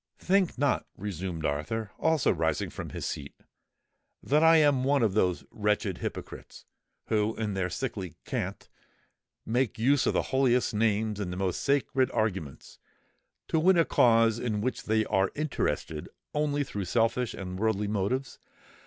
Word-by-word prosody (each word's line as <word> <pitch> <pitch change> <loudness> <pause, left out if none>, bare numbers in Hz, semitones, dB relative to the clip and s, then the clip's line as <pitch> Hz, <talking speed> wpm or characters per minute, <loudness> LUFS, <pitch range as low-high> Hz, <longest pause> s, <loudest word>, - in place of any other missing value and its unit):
"Think 190 -4 +1
not," 140 0 +1
resumed 90 -4 -4
Arthur, 95 +9 -2
also 160 -3 +2
rising - - -1
from - - -6
his - - -5
seat, 70 -1 -5 0.9
"that 150 +3 +3
I 165 0 +7
am 145 -4 +4
one 140 -1 +2
of 105 -4 +2
those 90 -4 +1
wretched 105 -3 -1
hypocrites, - - -7 0.4
who, 110 0 +1
in 110 -2 -2
their 95 -1 -1
sickly 100 - -4
cant, - - -4 0.8
make 120 +1 0
use 135 +5 +3
of - - +2
the - - +2
holiest 125 -2 +3
names 110 -1 +1
and 95 -3 -3
the 90 - -5
most 95 -2 -1
sacred 135 -2 +1
arguments 95 - -3 0.7
to 160 - +2
win 180 +3 +4
a 165 - +5
cause 115 -1 +4
in 115 -4 -1
which 125 +5 -3
they 110 0 +2
are 95 0 +1
interested 130 - -2 0.2
only 145 -1 0
through 100 -7 -5
selfish 115 +4 0
and 90 -1 -6
worldly 105 -1 0
motives. 110 +6 -2
110 Hz, 155 wpm, -28 LUFS, 95-135 Hz, 0.9 s, I